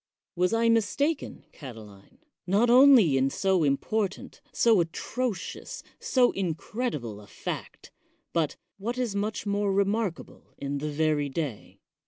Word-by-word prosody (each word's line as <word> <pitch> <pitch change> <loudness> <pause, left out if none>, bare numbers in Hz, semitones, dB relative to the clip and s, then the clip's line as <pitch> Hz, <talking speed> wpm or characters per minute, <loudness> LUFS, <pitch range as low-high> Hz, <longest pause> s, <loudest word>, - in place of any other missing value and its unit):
Was 180 +2 +2
I 230 0 +2
mistaken, 230 +8 0
Catiline, 110 -8 -12 0.3
not 215 +6 +3
only 245 - +7
in 135 +1 +2
so 190 +2 +1
important, 190 +8 -1
so 225 -4 +4
atrocious,, 215 +7 -4 0.2
so 250 -2 +3
incredible 165 - -3
a 105 - -15
fact, - - -7 0.4
but, 160 -3 0 0.2
what 235 +5 -3
is 240 -5 -1
much 210 +1 -2
more 205 0 0
re 200 +1 +3
markable, 200 -4 -4
in 140 0 -3
the 150 +1 -3
very 150 -1 0
day? 135 -6 -5
195 Hz, 130 wpm, -27 LUFS, 145-230 Hz, 0.4 s, only